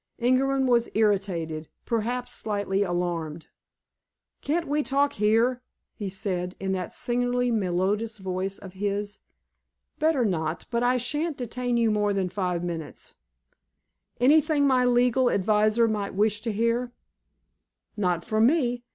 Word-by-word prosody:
Ingerman 265 +2 +2
was 240 -2 +2
irritated—perhaps 205 +4 -1
slightly 200 -2 -1
alarmed. 175 -4 -2 0.9
"Can't 325 +3 -1
we 295 +2 +1
talk 280 0 +1
here?" 225 +4 +2 0.3
he 205 -4 -5
said, 185 -2 -3
in 190 0 -2
that 185 -2 -3
singularly 245 0 0
melodious 205 +2 0
voice 190 0 -3
of 190 -2 -11
his. 205 +1 -3 0.8
"Better 310 -6 +2
not, 160 -4 -2
but 235 0 0
I 250 +1 +3
shan't 295 +5 -1
detain 245 0 -2
you 230 -2 +3
more 210 -1 +1
than 190 -2 -1
five 180 -2 -2
minutes." 165 -3 -6 1.1
"Anything 290 +2 +4
my 255 -2 +3
legal 245 +1 +3
adviser 215 +3 +3
might 205 -3 -2
wish 210 +1 +1
to 230 0 -2
hear?" 230 +3 0 1.0
"Not 180 -5 0
from 220 0 +3
me. 245 -5 +1
215 Hz, 125 wpm, -26 LUFS, 190-245 Hz, 1.1 s, Anything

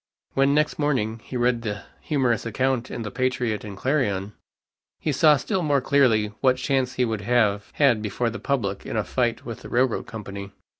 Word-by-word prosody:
When 135 +1 +3
next 150 +1 +1
morning, 115 -7 0
he 130 - -5
read 120 -1 +2
the 105 -3 -4 0.2
humorous 130 -7 +1
account 130 +1 -1
in 115 - -5
the 105 - -5
Patriot 125 -4 -1
and 100 -2 -8
Clarion, 105 -7 0 0.7
he 155 - -1
saw 150 +2 +5
still 190 +5 -1
more 145 -4 +2
clearly 125 -6 +3
what 130 -1 +4
chance 130 0 0
he 125 - +1
would 110 -3 -2
have 105 -3 +1
had 130 -7 +3
before 110 +3 -1
the 120 - -6
public 100 -8 -1
in - - -4
a 105 - +1
fight 120 -1 -1
with 115 -2 -6
the - - -9
railroad 125 -1 +1
company. 100 -3 -7
120 Hz, 190 wpm, -24 LUFS, 110-135 Hz, 0.7 s, saw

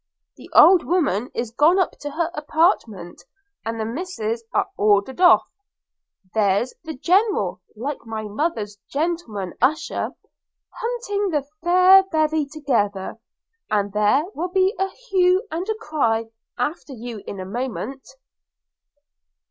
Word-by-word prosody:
The - - -14
old 365 -2 +8
woman 285 - 0
is 235 -2 -3
gone 305 +9 +4
up 375 - +2
to 290 - -5
her 330 +3 -2
apartment, 300 - 0 0.4
and 225 0 -4
the 220 - -1
misses 230 -4 -4
are - - +1
ordered 210 - +2
off. 355 - +7 0.9
There's 210 +3 +1
the 320 -1 -6
General, 335 - +1
like 265 +5 -5
my 220 -1 -4
mother's 210 -3 -3
gentleman 280 - -3
usher, 280 +5 0 0.6
hunting 455 -4 -2
the 295 -5 -1 0.2
fair 365 +2 +7
bevy 310 -2 +1
together, 230 -10 -2 0.5
and 205 -2 0
there 210 +7 +3
will 350 +3 -3
be 380 +2 +2
a 385 0 +1
hue 380 -3 +1
and 340 +4 -3
cry 230 - -1 0.3
after 300 -2 -3
you 235 -3 -7
in 195 - -6
a 185 - -5
moment.' 255 +4 -5
285 Hz, 125 wpm, -22 LUFS, 220-350 Hz, 0.9 s, old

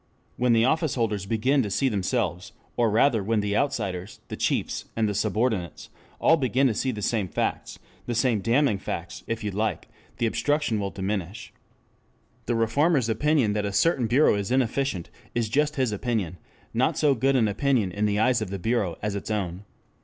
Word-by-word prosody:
When 125 -1 +2
the 115 0 +4
office 155 +1 +1
holders 105 -5 -1
begin 130 +6 +2
to 105 - -2
see 135 +8 +1
themselves, 100 -4 -1 0.2
or 120 -2 +2
rather 110 0 +3
when 110 +2 +1
the 100 0 -1
outsiders, 100 -8 -2
the - - -4
chiefs, - - -1
and 110 -1 +1
the 105 - -1
subordinates 105 -4 -1 0.3
all 165 - +5
begin 130 -1 +1
to 125 - +3
see 130 - -1
the 105 -5 -4
same 105 -4 0
facts, - - -3 0.3
the 120 - -2
same 115 -2 +2
damning 115 +1 +2
facts - - -6
if 115 -1 -3
you 105 - -2
like, 105 -3 -2 0.3
the 115 - 0
obstruction 145 -1 0
will 100 -1 -2
diminish. 100 +2 -4 0.9
The 120 - +1
reformer's 130 +3 +2
opinion 135 -2 +2
that 105 0 -1
a 100 - -2
certain 125 - +2
bureau 130 +7 +4
is 100 -1 -2
inefficient 130 -6 0 0.2
is 115 -2 0
just 150 +4 +1
his 130 -4 +1
opinion, 105 -5 -2 0.3
not - - +1
so 150 -2 +4
good 135 +2 +1
an 115 -4 +3
opinion 110 -1 +1
in 105 +3 0
the 105 0 0
eyes 115 +2 +2
of 105 - -3
the 100 - -4
bureau, 100 -4 -1
as 105 -1 -1
its 100 +1 -5
own. 95 -2 -3
110 Hz, 190 wpm, -25 LUFS, 100-130 Hz, 0.9 s, all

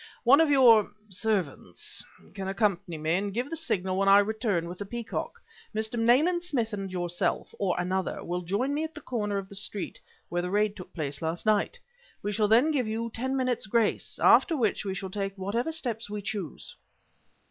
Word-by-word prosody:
One 275 +5 +7
of 320 - +3
your 240 -7 +6 0.2
servants 185 - -2 0.3
can 195 -1 -5
accompany 195 -4 0
me, 155 +1 0
and 200 +3 0
give 245 +8 -3
the - - -1
signal 190 - -1
when 195 0 +3
I 200 - +9
return 205 -4 +1
with 180 +1 -8
the 205 - -4
peacock. 235 +1 -4 0.4
Mr. 220 +2 0
Nayland 295 +10 +4
Smith 245 -11 -1
and 195 -2 -4
yourself, 175 -1 -1
or 190 -3 +1
another, 185 +1 -1
will 175 +1 -2
join 200 +11 -1
me 300 +2 0
at 320 -1 -6
the 300 - -7
corner 210 -6 -2
of 195 -1 -4
the 200 - -12
street 200 0 -2 0.3
where 175 0 -1
the 180 - -3
raid 205 +1 +1
took 180 -1 -10
place 145 -3 -3
last 165 +4 -3
night. 215 - +2 0.5
We 205 - -1
shall 210 0 +2
then 240 +9 +5
give 260 -6 0
you 225 +1 -3
ten 260 +3 -2
minutes 250 -4 0
grace, 225 0 +1
after 325 - +5
which 220 -6 +1
we 190 -1 -2
shall 190 0 -5
take 195 0 -3
whatever 215 +10 -1
steps 235 -9 -2
we 205 -1 -5
choose." 195 -6 -4
210 Hz, 195 wpm, -28 LUFS, 190-240 Hz, 0.5 s, I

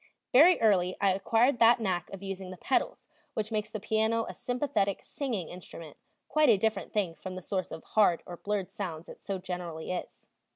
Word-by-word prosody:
Very 325 +8 +7
early 185 -5 +3
I 200 -1 +4
acquired 230 +6 +2
that 235 +1 +6
knack 185 -6 -1
of 195 0 -9
using 195 -1 -5
the 185 - -8
pedals, 260 - -1 0.3
which 215 0 -2
makes 210 -1 -1
the 215 - -5
piano 220 +2 +1
a - - -6
sympathetic, 245 -6 -1
singing 230 - -3
instrument, 165 -4 -10 0.3
quite 305 -1 +3
a 220 - +6
different 220 +2 -1
thing 195 -6 0
from 185 +2 -8
the 185 - -6
source 185 0 -2
of 160 - -7
hard 200 -6 +3
or 175 - -8
blurred 200 -1 -2
sounds 170 -5 -5
it - - -11
so 195 -1 -3
generally 180 -3 -5
is. 180 - -6
200 Hz, 195 wpm, -30 LUFS, 180-225 Hz, 0.3 s, Very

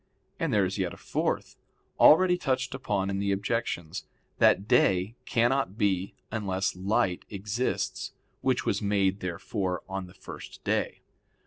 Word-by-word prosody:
And 165 -3 0
there 105 -4 +4
is 95 +2 -3
yet 90 -2 -1
a - - -16
fourth, - - -2 0.4
already 180 +3 +7
touched 130 -8 -1
upon 100 -7 -1
in 95 - -1
the 100 0 0
objections; 95 -5 -2 0.3
that 100 - +4
day 95 0 +3
cannot 120 -3 +1
be 95 -2 0 0.2
unless 100 -4 -1
light 95 -1 0
exists, 105 +5 -2 0.3
which - - +1
was - - 0
made 100 -1 +1
therefore 90 +1 -3
on 95 -1 -4
the 90 - -16
first 95 - -10
day. - - -1
100 Hz, 140 wpm, -28 LUFS, 95-115 Hz, 0.4 s, already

